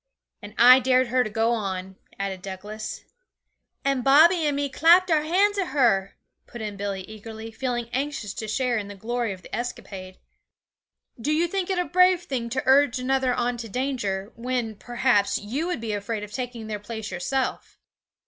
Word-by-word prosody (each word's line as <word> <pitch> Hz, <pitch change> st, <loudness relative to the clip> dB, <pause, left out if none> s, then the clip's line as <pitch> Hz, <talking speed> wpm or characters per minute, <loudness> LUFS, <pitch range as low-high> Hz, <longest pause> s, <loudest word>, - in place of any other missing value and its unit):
'And 205 Hz, +1 st, -10 dB
I 250 Hz, +2 st, +9 dB
dared 255 Hz, -1 st, +2 dB
her 255 Hz, +1 st, +3 dB
to 215 Hz, -, -4 dB
go 225 Hz, +2 st, +1 dB
on,' 190 Hz, -4 st, -3 dB, 0.2 s
added 195 Hz, -2 st, -4 dB
Douglas. 205 Hz, +3 st, -7 dB, 0.8 s
'And 275 Hz, -2 st, +1 dB
Bobby 315 Hz, +5 st, +6 dB
and 290 Hz, -, 0 dB
me 285 Hz, 0 st, 0 dB
clapped 340 Hz, +6 st, +5 dB
our 310 Hz, -2 st, +4 dB
hands 395 Hz, +6 st, +2 dB
at 380 Hz, -, 0 dB
her,' 210 Hz, -9 st, +2 dB, 0.3 s
put 240 Hz, -, -9 dB
in 210 Hz, -2 st, -5 dB
Billy 200 Hz, -1 st, -3 dB
eagerly, 220 Hz, +2 st, -9 dB
feeling 240 Hz, 0 st, -3 dB
anxious 270 Hz, -6 st, -3 dB
to 220 Hz, -, -6 dB
share 245 Hz, +1 st, 0 dB
in 205 Hz, -, -6 dB
the 205 Hz, -, -9 dB
glory 235 Hz, +2 st, -2 dB
of 185 Hz, -1 st, -9 dB
the -, -, -6 dB
escapade. 195 Hz, -6 st, -6 dB, 1.0 s
'Do 290 Hz, -, 0 dB
you 325 Hz, +3 st, +2 dB
think 380 Hz, +1 st, -2 dB
it 380 Hz, -, 0 dB
a 360 Hz, -, +1 dB
brave 365 Hz, 0 st, +4 dB
thing 250 Hz, -8 st, -3 dB
to 260 Hz, +2 st, -2 dB
urge 270 Hz, -1 st, +4 dB
another 260 Hz, 0 st, +1 dB
on 245 Hz, 0 st, -1 dB
to 230 Hz, -1 st, -7 dB
danger, 225 Hz, -5 st, -2 dB
when, 240 Hz, -1 st, -2 dB
perhaps, 240 Hz, -2 st, +1 dB
you 265 Hz, +11 st, -3 dB
would 360 Hz, -, -2 dB
be 225 Hz, -2 st, -3 dB
afraid 205 Hz, +1 st, -3 dB
of 210 Hz, -, -8 dB
taking 245 Hz, -2 st, -5 dB
their 215 Hz, -1 st, -4 dB
place 220 Hz, 0 st, -6 dB
yourself?' 260 Hz, +9 st, -3 dB
240 Hz, 185 wpm, -25 LUFS, 210-275 Hz, 1.0 s, I